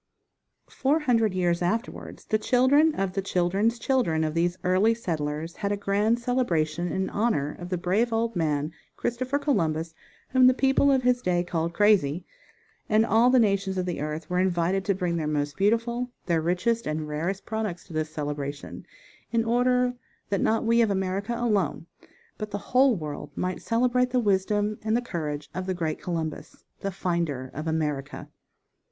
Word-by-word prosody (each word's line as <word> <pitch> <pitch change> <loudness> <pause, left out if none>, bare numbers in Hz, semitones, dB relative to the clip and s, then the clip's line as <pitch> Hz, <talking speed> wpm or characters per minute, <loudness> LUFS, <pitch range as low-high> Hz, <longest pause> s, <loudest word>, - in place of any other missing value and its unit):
Four 290 +4 +1
hundred 225 -8 +2
years 175 -1 +1
afterwards 225 +7 -3
the 215 - +1
children 270 +7 +4
of 195 -1 -1
the 195 - -1
children's 195 +5 +1
children 235 -11 +1
of 155 -1 -1
these 175 +2 0
early 190 +5 +3
settlers, 160 -5 -3
had 200 -1 -2
a 205 - 0
grand 205 +3 +1
celebration 175 -10 0
in 190 0 -1
honor 200 -10 0
of 175 0 -7
the 180 - -1
brave 200 +7 +1
old 225 0 0
man, 150 -2 0 0.3
Christopher 255 +3 -1
Columbus, 165 - 0 0.4
whom 255 -1 +5
the 255 - +5
people 270 +1 +3
of 265 -2 +2
his 250 0 +2
day 175 -3 +1
called 170 -1 -2
crazy, 185 -7 +3 0.6
and 215 +1 +4
all 230 +2 +4
the 255 - +5
nations 200 -4 +2
of 185 - 0
the 175 -5 -3
earth 155 +1 -4
were 180 +1 0
invited 185 +1 +1
to 200 - +1
bring 175 -2 -1
their 155 -2 -2
most 145 -1 -1
beautiful, 230 +4 +1 0.2
their 170 -2 +1
richest 185 +8 0
and 155 0 -2
rarest 170 +6 -3
products 220 -5 -3
to 170 - -13
this 155 0 -1
celebration, 145 -2 -5 0.4
in 230 -1 +1
order 250 +1 +2 0.4
that 200 - 0
not 225 +1 +1
we 230 +1 +4
of 225 - +3
America 195 +3 -1
alone, 210 -10 0 0.5
but 215 -1 -4
_the 205 - -3
whole 250 +5 +3
world 150 -4 -6
might 185 0 -2
celebrate 250 +2 +1
the 250 0 +1
wisdom 205 0 +1
and 220 +1 +1
the - - 0
courage 150 -8 -4
of 185 0 -4
the 185 - -1
great 160 -3 -3
Columbus, 165 -3 -5 0.2
"the 195 - -3
finder 170 -8 -2
of 155 +3 -5
America." 150 -4 -2
190 Hz, 175 wpm, -26 LUFS, 165-230 Hz, 0.6 s, whom